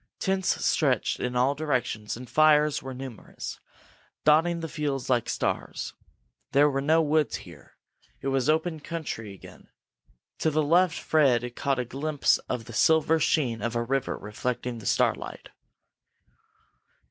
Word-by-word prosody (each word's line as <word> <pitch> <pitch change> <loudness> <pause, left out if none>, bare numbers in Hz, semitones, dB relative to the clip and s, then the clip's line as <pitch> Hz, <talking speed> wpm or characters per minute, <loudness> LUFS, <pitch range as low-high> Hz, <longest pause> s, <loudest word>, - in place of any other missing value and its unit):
Tents 190 -1 0
stretched - - +1
in 125 0 -2
all 125 +3 +3
directions 125 -8 -2
and 125 +1 -9
fires 150 +2 +4
were 135 - -7
numerous, 130 -3 -8 0.7
dotting 165 +3 +4
the 165 - -3
fields 145 -4 -3
like 120 -3 +1
stars. - - -2 0.6
There 145 +1 +5
were 135 0 -1
no 160 +3 +3
woods 155 0 +1
here; - - -15 0.4
it 135 - -3
was 135 0 +1
open 160 +1 +1
country 145 -10 -5
again. 100 - -14 0.7
To 160 - +2
the 155 0 +1
left 170 +3 +3
Fred 125 -6 +2
caught 140 -1 0
a 125 - -1
glimpse 145 +4 +1
of 120 -3 -3
the 120 - -10
silver 160 +5 +3
sheen 125 -8 +1
of 120 +1 -2
a 120 - +1
river 135 +2 -1
reflecting 120 +3 -4
the 105 - -7
starlight. - - 0
140 Hz, 145 wpm, -27 LUFS, 125-155 Hz, 0.7 s, There